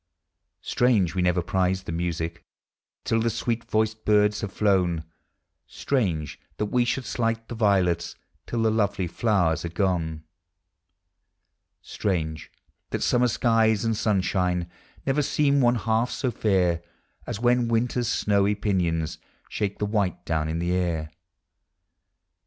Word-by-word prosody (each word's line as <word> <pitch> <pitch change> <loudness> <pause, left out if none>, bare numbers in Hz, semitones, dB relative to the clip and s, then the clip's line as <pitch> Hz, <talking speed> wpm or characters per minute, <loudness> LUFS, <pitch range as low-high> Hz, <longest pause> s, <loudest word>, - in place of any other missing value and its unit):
Strange, 110 -9 +2
we 90 - 0
never 90 0 +2
prize 95 +1 0
the 80 - -6
music 85 0 -3 0.6
Till 115 - +1
the 115 - +1
sweet 115 +1 -2
voiced 110 0 0
birds 105 0 +3
have 100 -3 -4
llown; 90 -6 +2 0.6
Strange, 90 - -1 0.2
that 105 - 0
we 125 -1 +3
should 125 +1 -1
slight 115 -1 -1
the - - -6
violets 100 -6 +1 0.3
Till 115 -1 -1
the 110 - +3
lovely 100 -4 0
tlowers 85 -5 +1
are 85 - -3
gone; 85 -4 -1 1.6
Strange, 80 -6 -3 0.4
that - - -2
summer 125 0 +3
skies 115 -2 +2
and 115 -1 +1
sunshine 90 -4 0 0.4
Never 135 +2 +2
seem 140 0 +2
one 120 -1 +4
half 115 +1 +1
so 130 -3 -2
fair 90 -6 +1 0.5
As - - -4
when 120 0 +3
winters 115 +1 0
snowy 105 -2 +2
pinions 85 -6 -1 0.3
Shake 100 -1 -2
the 105 - -1
white 100 -4 -1
down 80 -2 0
in 80 - -2
the 85 +1 -1
air. 85 -4 -1
100 Hz, 135 wpm, -25 LUFS, 85-115 Hz, 1.6 s, one